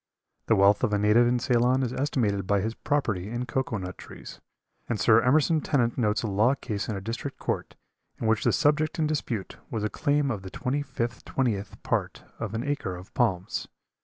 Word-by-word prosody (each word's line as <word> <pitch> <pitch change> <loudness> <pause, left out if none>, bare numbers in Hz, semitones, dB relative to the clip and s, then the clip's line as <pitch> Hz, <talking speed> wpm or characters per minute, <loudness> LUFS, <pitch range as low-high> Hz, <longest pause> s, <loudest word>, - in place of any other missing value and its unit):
The - - +4
wealth 100 +3 +4
of 110 -5 +2
a - - +3
native 105 +4 +4
in 125 +1 +2
Ceylon 125 +1 +2
is 125 -1 -2
estimated 105 -9 0
by 100 0 +3
his 110 +4 -2
property 110 -10 -1
in 120 +2 -3
cocoa 125 -2 -1
nut 95 -1 -6
trees, - - -11 0.5
and 115 -3 -1
Sir 110 +4 +5
Emerson 155 +5 +3
Tennent 120 -7 +1
notes 110 -3 +1
a - - -1
law 110 +7 +3
case 110 -5 -4
in 110 - -2
a 95 - -4
district 115 +7 -5
court - - -3 0.4
in - - -3
which 110 -1 +2
the - - +3
subject 150 +1 +2
in 160 - +1
dispute 135 -9 -3
was 110 -3 -3
a 105 - -1
claim 145 -2 +1
of 105 -5 -3
the 95 - -8
twenty 130 +9 -2
fifth 120 -4 -4
twentieth 105 -7 -2
part - - -2 0.2
of 110 -1 -4
an 115 - -2
acre 140 -10 -2
of 90 +2 -12
palms. 100 -7 0
115 Hz, 205 wpm, -27 LUFS, 105-135 Hz, 0.5 s, Sir